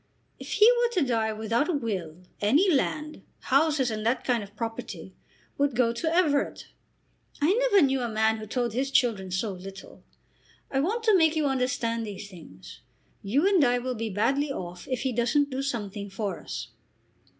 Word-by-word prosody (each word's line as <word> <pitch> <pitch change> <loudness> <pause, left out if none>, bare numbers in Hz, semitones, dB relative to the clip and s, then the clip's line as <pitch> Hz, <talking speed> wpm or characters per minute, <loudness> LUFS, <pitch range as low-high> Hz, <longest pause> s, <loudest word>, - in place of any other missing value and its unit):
"If - - -6
he 430 - +6
were 480 -1 +2
to 350 -9 +2
die 225 -2 +1
without 225 - -1
a - - +1
will, 185 - -4 0.2
any 290 - +3
land, 305 +1 -1 0.2
houses 275 -2 +2
and 215 -1 -4
that 235 +3 0
kind 245 -3 +1
of 205 0 -11
property, 225 0 -6 0.5
would 285 -3 +1
go 235 -2 +2
to 320 +7 -2
Everett. 315 -5 +1 0.7
I 305 +6 +3
never 425 -8 +4
knew 270 -1 0
a 240 - -2
man 220 0 +1
who 215 0 -8
told 240 0 -1
his 265 +3 -1
children 225 -8 +1
so 190 +4 -1
little. 195 +1 -10 0.7
I 270 - +1
want 425 - -1
to 435 -3 +5
make 320 -3 +4
you 310 -2 +1
understand 250 -4 0
these 205 -1 -7
things. 120 - -13 0.4
You 270 - +1
and 385 -6 +4
I 245 -1 +3
will 250 +1 -3
be 225 -1 -3
badly 270 +9 0
off 175 -7 -7
if 255 -3 -2
he 265 - 0
doesn't 250 +5 +1
do 260 +1 -2
something 205 -6 -4
for 195 -2 -4
us." - - -6
245 Hz, 185 wpm, -27 LUFS, 215-285 Hz, 0.7 s, he